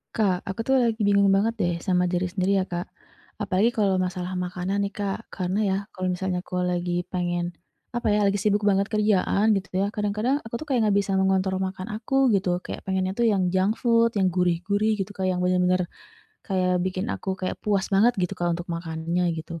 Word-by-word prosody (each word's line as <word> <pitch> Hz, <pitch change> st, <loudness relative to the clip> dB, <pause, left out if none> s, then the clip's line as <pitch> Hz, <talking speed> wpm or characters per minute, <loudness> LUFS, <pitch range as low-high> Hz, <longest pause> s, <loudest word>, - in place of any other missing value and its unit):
Kak, 190 Hz, -5 st, +1 dB
aku 225 Hz, +4 st, -3 dB
tuh 265 Hz, -, +3 dB
lagi 230 Hz, -2 st, +1 dB
bingung 200 Hz, 0 st, +4 dB
banget 200 Hz, +4 st, +3 dB
deh, 175 Hz, -1 st, +1 dB
sama 180 Hz, -1 st, +2 dB
diri 180 Hz, 0 st, 0 dB
sendiri 190 Hz, +2 st, 0 dB
ya, 185 Hz, -, +1 dB
Kak. 175 Hz, -1 st, -5 dB, 0.5 s
Apalagi 205 Hz, +1 st, +2 dB
kalau 200 Hz, -5 st, +1 dB
masalah 180 Hz, 0 st, -3 dB
makanan 180 Hz, +2 st, -2 dB
nih, 200 Hz, -, 0 dB
Kak. 205 Hz, +2 st, -4 dB
Karena 185 Hz, +1 st, -2 dB
ya, 190 Hz, -, +1 dB, 0.2 s
kalau 185 Hz, 0 st, -2 dB
misalnya 180 Hz, 0 st, -2 dB
aku 180 Hz, 0 st, -5 dB
lagi 175 Hz, 0 st, -1 dB
pengen, 175 Hz, -1 st, -1 dB, 0.4 s
apa 240 Hz, -2 st, 0 dB
ya, 210 Hz, 0 st, +3 dB
lagi 200 Hz, 0 st, +1 dB
sibuk 210 Hz, -1 st, +1 dB
banget 200 Hz, 0 st, +2 dB
kerjaan 210 Hz, 0 st, +2 dB
gitu, 195 Hz, -1 st, -2 dB
ya, 200 Hz, +2 st, 0 dB
kadang-kadang, 215 Hz, +7 st, 0 dB
aku 225 Hz, -, -12 dB
tuh 310 Hz, -, -8 dB
kayak 245 Hz, -, +3 dB
nggak 200 Hz, -, +3 dB
bisa 200 Hz, -1 st, 0 dB
mengontrol 190 Hz, 0 st, +1 dB
makan 190 Hz, +2 st, -4 dB
aku, 255 Hz, +3 st, +2 dB
gitu. 185 Hz, -3 st, +1 dB
Kayak, -, -, -6 dB
pengennya 190 Hz, 0 st, 0 dB
tuh 235 Hz, +2 st, +2 dB
yang 185 Hz, -4 st, +1 dB
junk 190 Hz, +4 st, +2 dB
food, 230 Hz, -1 st, +3 dB
yang 190 Hz, -3 st, +2 dB
gurih-gurih, 190 Hz, +5 st, +1 dB
gitu 195 Hz, 0 st, -4 dB
Kak. 190 Hz, -2 st, -1 dB
Yang 180 Hz, -1 st, 0 dB
bener-bener, 180 Hz, 0 st, +2 dB, 0.6 s
kayak 185 Hz, -2 st, 0 dB
bikin 185 Hz, +1 st, -2 dB
aku 190 Hz, -1 st, -3 dB
kayak 185 Hz, -1 st, -4 dB
puas 200 Hz, -2 st, 0 dB
banget, 225 Hz, +5 st, +4 dB
gitu 180 Hz, -1 st, -1 dB
Kak, 175 Hz, -2 st, -1 dB
untuk 175 Hz, -, -6 dB
makannya 170 Hz, +1 st, -2 dB
gitu. 165 Hz, +1 st, -7 dB
190 Hz, 200 wpm, -25 LUFS, 180-205 Hz, 0.6 s, bingung